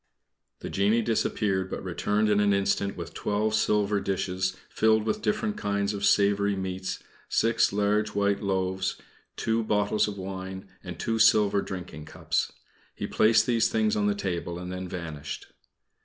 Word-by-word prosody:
The - - -5
genie 105 +4 +2
disappeared, 100 -4 0
but - - -5
returned 105 +1 0
in 105 -1 +3
an 100 -1 +3
instant 100 0 0
with 85 -2 -7
twelve 105 +1 -1
silver 105 -1 +2
dishes, 95 -1 -1
filled 110 0 +3
with 210 - -1
different 210 0 -1
kinds 100 0 -1
of 100 -1 -2
savory 100 0 +3
meats, 95 0 -4 0.3
six 115 0 +2
large 105 +1 +1
white 100 0 +1
loaves, 95 -1 -1 0.4
two 115 0 0
bottles 105 0 +1
of 105 -1 -5
wine, 95 0 -6 0.2
and 90 -3 -7
two 115 -1 -1
silver 105 -2 +5
drinking 90 -6 -7
cups. - - -2 0.4
He - - -4
placed 110 0 +4
these 115 -2 +2
things 220 -1 +1
on 210 -1 +1
the 205 - +1
table 85 - -3
and 90 0 -6
then 95 0 -5
vanished. 80 -5 -7
100 Hz, 155 wpm, -27 LUFS, 95-110 Hz, 0.4 s, silver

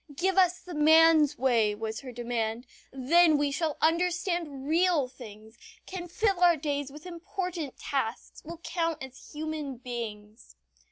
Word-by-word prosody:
"Give 375 +5 0
us 365 -2 +4
the 360 - -9
man's 315 -1 +5
way," 230 -5 +2
was 220 +1 -4
her 260 -2 -9
demand, 235 -1 -3 0.3
"then 310 +4 +4
we 290 -1 0
shall 310 +1 -2
understand 335 -4 0
real 330 -3 +2
things, 220 -3 -13 0.3
can 365 -2 -6
fill 395 0 0
our 350 -2 +5
days 285 -2 -3
with 300 +3 -12
important 350 -3 -5
tasks, 255 -5 -4
will 335 +2 -8
count 330 -4 -2
as 265 0 -11
human 305 -3 -4
beings." 220 - -8
295 Hz, 145 wpm, -28 LUFS, 250-340 Hz, 0.3 s, man's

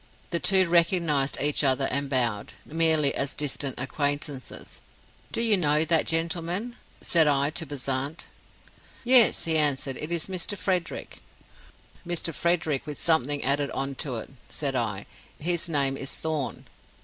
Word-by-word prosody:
The 170 - 0
two 190 0 +4
recognized 170 -5 +2
each 145 +1 +3
other 135 0 +2
and 140 +1 -1
bowed, 120 -6 -1
merely 160 -2 +2
as 140 - -1
distant 140 -2 -1
acquaintances. 145 0 -4 0.5
'Do - - -2
you 225 -2 +4
know 155 -3 +2
that 165 -1 +2
gentleman?' 170 +7 -1 0.3
said 165 -3 +4
I 140 0 +2
to 160 +1 -3
Bezant. 140 +2 -3 0.8
'Yes,' 245 -2 +5
he 160 -1 +3
answered, 140 -3 +1
'it 155 - -5
is 170 -2 +1
Mr. 190 +2 -2
Frederick.' 180 -3 -3 0.8
'Mr. 170 -1 -3
Frederick 160 -4 0
with 150 - -6
something 145 -4 +1
added 140 +1 +1
on 135 0 -2
to 135 -6 -4
it,' 115 - -7 0.2
said 140 -3 -2
I; 105 -5 -2 0.3
'his 170 +2 0
name 140 -3 +2
is 135 - -5
Thorn. 155 -4 -4
150 Hz, 145 wpm, -26 LUFS, 140-170 Hz, 0.8 s, Yes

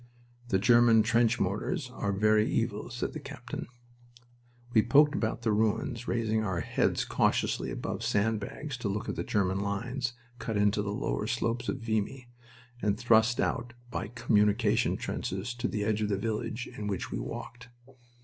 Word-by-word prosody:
"The 95 - +2
German 115 +1 +6
trench 115 +2 +3
mortars 125 - -1
are 100 -5 -1
very 105 +2 +3
evil," 110 -1 -1
said 120 0 -3
the 155 - -5
captain. 125 -4 -7 1.1
We 110 - +6
poked 145 +6 +5
about 115 -3 -2
the 110 - +2
ruins, 110 +3 0
raising 110 -2 0
our 95 -5 -1
heads - - +1
cautiously - - +1
above - - -4
sand 110 +2 +1
bags 130 +6 -6
to 120 -4 -3
look 105 +2 -3
at - - -2
the - - -2
German 95 -2 0
lines 120 +6 -2 0.3
cut 110 -2 -2
into 105 +1 +3
the 100 - -3
lower - - -2
slopes 120 +1 -1
of 135 - -3
Vimy, 115 +3 -2 0.5
and 105 0 +1
thrust 115 0 +4
out 120 0 -1 0.2
by - - -3
communication 105 0 +2
trenches 95 +6 -3
to 120 0 -2
the 105 - -2
edge 110 0 0
of 105 - 0
the 100 - +1
village 110 +3 -3
in 105 - -4
which 100 -3 -3
we - - -2
walked. 120 0 -7
110 Hz, 170 wpm, -30 LUFS, 105-120 Hz, 1.1 s, German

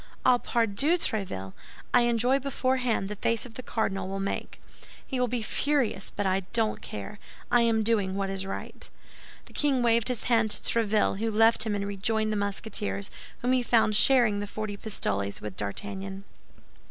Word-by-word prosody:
Ah, 250 -1 +5
pardieu, 235 - +1
Tréville! 180 - -3 0.4
I 245 - +6
enjoy 245 +4 +2
beforehand 255 -5 0
the 210 - -4
face 230 +2 +1
the 245 0 -8
cardinal 195 -6 -2
will 195 +1 -4
make. 195 0 -4 0.5
He 260 - -3
will 250 - +2
be 240 -1 -2
furious; 260 -6 0
but 205 - -1
I 190 0 +2
don't 225 -2 0
care. 105 - -7 0.3
I 240 - +5
am 225 -1 +2
doing 205 -4 +1
what 195 -1 -2
is 195 0 -3
right." 195 - -7 0.6
The - - -17
king 275 -4 +1
waved 230 -1 +3
his 250 -3 -2
hand 225 -3 +2
to - - -1
Tréville, 215 -3 +1
who 225 +1 0
left 225 +1 +3
him 210 - 0
and 200 0 -2
rejoined 215 +2 -1
the - - -1
Musketeers, 200 0 -3 0.3
whom 250 - +2
he 255 -1 +3
found 225 -3 +3
sharing 220 -2 +6
the 205 - -4
forty 215 0 -5
pistoles 100 - -3
with 105 -3 -7
D'Artagnan. 195 - -5
220 Hz, 175 wpm, -27 LUFS, 195-240 Hz, 0.6 s, I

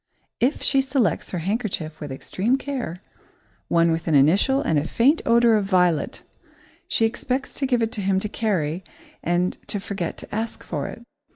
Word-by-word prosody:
If 260 +5 +1
she 275 - +4
selects 265 - 0
her 180 - -3
handkerchief 185 -4 -2
with 145 -2 -6
extreme 200 - 0
care, 250 - -5 0.6
one 170 0 +3
with 165 +1 -2
an 160 - +3
initial 185 - +4
and 160 - +1
a 150 - -3
faint 280 +7 +3
odour 235 0 +5
of 210 -2 +2
violet 180 -5 +1 0.6
she 225 - +2
expects 255 +4 -2
to 275 - -2
give 245 -3 +2
it 225 - -1
to 220 -4 -3
him 190 0 +2
to 210 - -2
carry 185 -6 -1 0.4
and 175 +2 0
to 205 - -2
forget 190 -3 -4
to - - -10
ask 220 +2 -3
for 145 -4 -3
it. 235 - -9
200 Hz, 180 wpm, -23 LUFS, 170-235 Hz, 0.6 s, odour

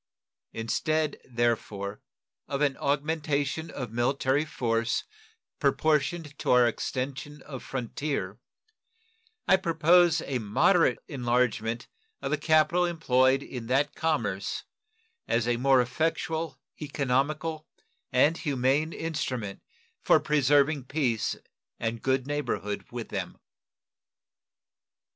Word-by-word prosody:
Instead, 155 +7 -1
therefore, 110 -4 -2 0.5
of 140 - -2
an 140 -2 +2
augmentation 150 +1 -1
of 125 -5 -6
military 130 +4 +1
force 115 -5 0 0.6
proportioned 155 0 +1
to - - -3
our 125 -1 +6
extension 135 +5 -4
of 135 -4 -8
frontier, 135 +3 -3 1.1
I 190 - +6
propose 170 -1 +4
a 130 -3 -2
moderate 120 - +3
enlargement 120 -3 0 0.3
of - - -4
the - - +1
capital 155 +2 +3
employed 135 -6 +2
in 120 -3 -7
that 140 +4 +1
commerce 115 -12 -1 0.6
as 115 0 +1
a 120 -1 +2
more 135 +1 +4
effectual, 160 +4 -2 0.2
economical, 150 +3 -1 0.4
and 145 +6 +4
humane 140 +3 +1
instrument 125 -10 -3 0.4
for - - +5
preserving 145 -1 +2
peace 125 -6 0 0.4
and 115 0 -2
good 130 -1 +1
neighborhood 140 -8 -3
with - - -6
them. - - -4
140 Hz, 100 wpm, -28 LUFS, 120-155 Hz, 1.1 s, our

